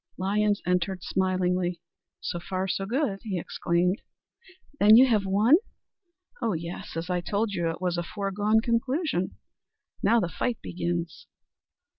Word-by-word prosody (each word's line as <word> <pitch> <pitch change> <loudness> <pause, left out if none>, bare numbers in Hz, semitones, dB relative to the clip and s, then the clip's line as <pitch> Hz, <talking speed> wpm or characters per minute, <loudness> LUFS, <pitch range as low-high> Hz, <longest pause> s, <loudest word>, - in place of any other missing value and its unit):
Lyons 205 +2 +1
entered 180 0 0
smilingly. 180 -2 0 0.4
"So 175 - -3
far 185 +2 -3
so 195 +1 -2
good," 235 -4 0
he 205 -6 -3
exclaimed. 175 +3 0 0.8
"Then 210 +2 +8
you 255 - +8
have 215 -6 +1
won?" 215 +10 +5 0.8
"Oh, 230 -4 +1
yes. 170 0 -6
As 170 +3 -3
I 180 -1 0
told 205 +4 -1
you, 170 -3 0
it 165 - -4
was 175 -1 -1
a - - -1
foregone 205 +4 0
conclusion. 235 - 0 0.7
Now 235 - +4
the 180 - 0
fight 235 +7 -2
begins." 170 -1 -4
190 Hz, 140 wpm, -27 LUFS, 175-215 Hz, 0.8 s, Then